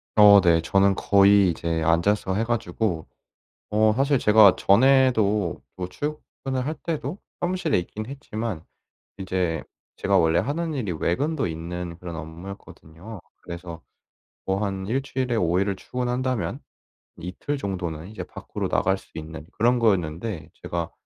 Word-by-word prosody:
어 105 Hz, -2 st, +8 dB
네. 85 Hz, -2 st, +4 dB
저는 95 Hz, +3 st, +3 dB
거의 100 Hz, -1 st, +5 dB
이제 85 Hz, -1 st, -2 dB
앉아서 95 Hz, +4 st, +2 dB
해 110 Hz, -, +1 dB
가지고 110 Hz, -6 st, -2 dB, 0.6 s
어 110 Hz, 0 st, +3 dB
사실 140 Hz, 0 st, +3 dB
제가 105 Hz, -3 st, +6 dB
전에도 110 Hz, -5 st, +3 dB
뭐 90 Hz, -1 st, -4 dB
출근을 135 Hz, 0 st, -4 dB
할 155 Hz, -, -1 dB
때도 155 Hz, -2 st, -4 dB, 0.2 s
사무실에 175 Hz, -, 0 dB
있긴 105 Hz, +5 st, -5 dB
했지만 115 Hz, -, -5 dB, 0.6 s
이제 90 Hz, -4 st, -1 dB, 0.4 s
제가 100 Hz, -1 st, +2 dB
원래 80 Hz, -1 st, +3 dB
하는 160 Hz, +3 st, -2 dB
일이 105 Hz, -10 st, -2 dB
외근도 140 Hz, -, 0 dB
있는 85 Hz, +1 st, -5 dB
그런 85 Hz, -1 st, -7 dB
업무였거든요. 85 Hz, +4 st, -10 dB, 0.2 s
그래서 85 Hz, -1 st, -8 dB, 0.7 s
뭐 95 Hz, +2 st, 0 dB
한 95 Hz, -1 st, -3 dB
1 130 Hz, +5 st, 0 dB
주일에 130 Hz, -3 st, -2 dB
5 90 Hz, -2 st, +2 dB
일을 100 Hz, 0 st, 0 dB
출근한다면 125 Hz, +2 st, -2 dB, 0.6 s
이틀 95 Hz, -, -4 dB
정도는 90 Hz, -, -4 dB
이제 110 Hz, -, -6 dB
밖으로 -, -, -5 dB
나갈 95 Hz, +1 st, +1 dB
수 -, -, -21 dB
있는 80 Hz, -1 st, -7 dB
그런 120 Hz, +3 st, +3 dB
거였는데 90 Hz, -4 st, -1 dB
제가 85 Hz, -1 st, -3 dB
100 Hz, 285 characters per minute, -24 LUFS, 85-120 Hz, 0.7 s, 어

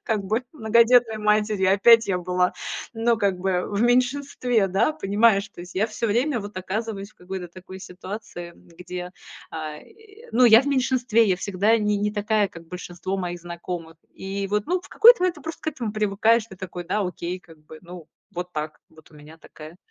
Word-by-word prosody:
как 215 Hz, -3 st, -1 dB
бы 220 Hz, +6 st, 0 dB
многодетной 235 Hz, -2 st, +4 dB
матерью. 210 Hz, -2 st, +2 dB
Опять 230 Hz, +3 st, +6 dB
я 185 Hz, -2 st, 0 dB
была, 180 Hz, 0 st, 0 dB, 0.4 s
ну, 230 Hz, 0 st, +1 dB
как 200 Hz, -4 st, 0 dB
бы 180 Hz, -1 st, 0 dB
в 200 Hz, 0 st, -3 dB
меньшинстве, 245 Hz, -2 st, +1 dB
да, 305 Hz, -, +3 dB
понимаешь. 210 Hz, -5 st, +2 dB
То 175 Hz, -, -13 dB
есть 180 Hz, 0 st, -11 dB
я 215 Hz, +4 st, +2 dB
всё 230 Hz, +1 st, -3 dB
время 240 Hz, +4 st, +1 dB
вот 205 Hz, -1 st, -9 dB
оказываюсь 200 Hz, +2 st, -4 dB
в -, -, -42 dB
какой-то 180 Hz, 0 st, -7 dB
такой 185 Hz, +1 st, -11 dB
ситуации, 185 Hz, -1 st, -8 dB
где, 180 Hz, +1 st, -9 dB, 0.4 s
а, 155 Hz, -1 st, -6 dB
и, 445 Hz, -, -18 dB
ну, 250 Hz, +2 st, +5 dB
я 225 Hz, -1 st, +8 dB
в -, -, -9 dB
меньшинстве, 255 Hz, -4 st, +2 dB
я 185 Hz, -, +2 dB
всегда 200 Hz, +4 st, +1 dB
не 210 Hz, -1 st, +1 dB
не 210 Hz, +1 st, 0 dB
такая, 210 Hz, -1 st, +1 dB
как 165 Hz, -1 st, -13 dB
большинство 180 Hz, +2 st, -5 dB
моих 175 Hz, -2 st, -4 dB
знакомых. 170 Hz, -1 st, -7 dB, 0.2 s
И 195 Hz, +1 st, -4 dB
вот, 210 Hz, 0 st, -1 dB
ну, 360 Hz, +2 st, 0 dB
в -, -, -15 dB
какой-то 475 Hz, 0 st, +7 dB
момент 365 Hz, -1 st, +1 dB
ты -, -, -13 dB
просто 320 Hz, 0 st, -7 dB
к -, -, -12 dB
этому 245 Hz, -9 st, -4 dB
привыкаешь. 215 Hz, +2 st, +2 dB
Ты 190 Hz, -, -13 dB
такой: 180 Hz, -1 st, -7 dB
"Да, 185 Hz, +5 st, -1 dB
окей, 180 Hz, -1 st, -4 dB
как 165 Hz, -3 st, -18 dB
бы, 155 Hz, +1 st, -12 dB
ну, 175 Hz, -2 st, -11 dB, 0.3 s
вот 180 Hz, +1 st, -5 dB
так, 155 Hz, 0 st, -5 dB
вот 160 Hz, 0 st, -19 dB
у -, -, -17 dB
меня 150 Hz, +2 st, -14 dB
такая". 155 Hz, +1 st, -13 dB
200 Hz, 195 wpm, -24 LUFS, 180-230 Hz, 0.4 s, я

